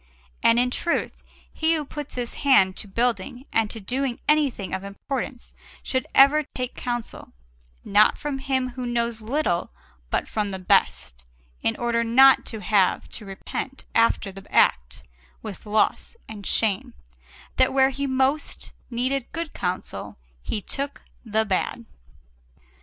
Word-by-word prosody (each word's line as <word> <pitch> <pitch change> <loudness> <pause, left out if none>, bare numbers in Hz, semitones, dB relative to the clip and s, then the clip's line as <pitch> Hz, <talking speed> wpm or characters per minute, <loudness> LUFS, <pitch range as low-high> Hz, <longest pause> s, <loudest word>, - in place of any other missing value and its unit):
And 230 - +5
in 250 +1 +2
truth, 340 +6 -1 0.3
he 320 +1 +2
who 305 -2 -2
puts 295 0 -6
his 245 -1 -3
hand 195 -10 +5
to - - -6
building 240 +4 -1
and 225 -2 +2
to 225 - -6
doing 250 +4 -2
anything 290 -10 +1
of 190 0 -3
importance 245 +5 -5 0.3
should 260 -2 -1
ever 280 +3 +7
take 250 0 -3
counsel, 240 -2 -5 0.5
not 210 +1 +5
from 290 -2 -4
him 265 -1 -1
who 250 0 -5
knows 235 -1 -1
little 225 - -1 0.4
but - - -1
from 210 -2 -2
the 190 - -4
best, - - +1 0.4
in 115 - +1
order 235 -1 0
not 265 +4 +6
to 220 -2 -6
have 195 -1 +2
to 215 - -8
repent 255 +7 -6
after 230 -3 +2
the 195 0 -13
act, - - +2 0.4
with 210 0 -8
loss 215 - +1
and 205 -2 -7
shame, 225 +3 0 0.6
that 260 - +4
where 265 0 +4
he 280 +1 -3
most 265 +3 -1 0.2
needed 255 +2 -1
good 330 -1 -4
counsel 180 +1 -4 0.2
he 210 - -3
took 280 +1 -4 0.2
the 220 -1 0
bad. 210 +4 -1
240 Hz, 145 wpm, -24 LUFS, 210-270 Hz, 0.6 s, ever